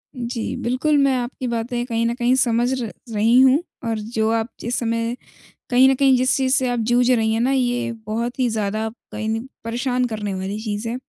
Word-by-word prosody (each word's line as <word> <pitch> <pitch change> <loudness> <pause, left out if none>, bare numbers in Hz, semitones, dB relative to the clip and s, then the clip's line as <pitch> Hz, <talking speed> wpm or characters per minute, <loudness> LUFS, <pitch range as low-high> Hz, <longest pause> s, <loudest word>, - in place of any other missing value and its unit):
जी, 240 -2 -4
बिल्कुल, 260 +5 +1
मैं 275 -2 +3
आपकी 250 +1 -4
बातें 240 +1 -2
कहीं 230 -2 -1
न 235 - +1
कहीं 245 +1 +2
समझ 240 -1 +2
र 225 - -4 0.2
रही 225 +4 +4
हूँ, 265 +5 +5 0.2
और 225 -1 -1
जो 220 0 -1
आप 225 0 0
जिस 235 +2 -2
समय 230 0 -1 0.6
कहीं 255 +2 +6
न 270 - +4
कहीं 265 0 +4
जिस 255 +1 +2
चीज़ 260 -1 +2
से 260 -3 +1
आप 245 - -1
जूझ 245 +1 +3
रही 225 -3 +2
हैं 225 - 0
ना, 250 +3 +2
ये 245 -2 0
बहुत 235 +4 -3
ही 255 -2 +2
ज़्यादा 215 0 -1 0.2
कहीं 215 0 -4
न 225 +2 -2 0.2
परेशान 245 +2 -1
करने 210 -3 -4
वाली 190 +2 -4
चीज़ 215 0 -3
है। 235 - -2
240 Hz, 210 wpm, -21 LUFS, 225-255 Hz, 0.6 s, कहीं